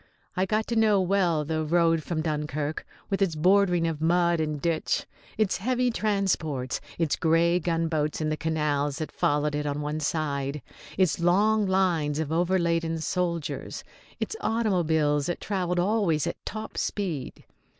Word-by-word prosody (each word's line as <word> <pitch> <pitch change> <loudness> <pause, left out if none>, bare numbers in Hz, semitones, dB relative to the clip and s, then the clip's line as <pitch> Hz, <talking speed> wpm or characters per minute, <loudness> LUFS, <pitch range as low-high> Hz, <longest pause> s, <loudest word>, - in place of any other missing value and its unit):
I 185 0 +1
got 215 +2 0
to 235 - 0
know 215 -3 +4
well 180 -5 +1
the 155 +1 -1
road 165 0 +2
from 155 0 -3
Dunkirk, 150 -1 -3 0.2
with 195 - 0
its 180 -5 +2
bordering 180 +1 +3
of 160 -2 -2
mud 170 +1 +3
and 155 -2 -1
ditch, 165 +1 0 0.3
its 215 -3 +1
heavy 250 +5 +1
transports, 190 - -1 0.2
its 165 -3 +1
grey 170 +2 +3
gunboats 165 -3 -1
in 155 -1 -1
the 155 - 0
canals 150 -3 -1
that 155 - -4
followed 145 +1 +1
it 150 0 -2
on 145 0 -2
one 150 +1 -3
side, 145 -3 -2 0.3
its 180 -5 +2
long 205 +5 +3
lines 175 -6 +1
of 155 -1 -2
over 175 +3 +2
laden 165 -2 0
soldiers, 170 -1 -3 0.4
its - - -3
automobiles 160 -10 +1
that 175 - -2
travelled 180 -3 -1
always 180 -5 +1
at - - -5
top 215 +1 -5
speed. 175 -10 -3
165 Hz, 155 wpm, -26 LUFS, 150-190 Hz, 0.4 s, know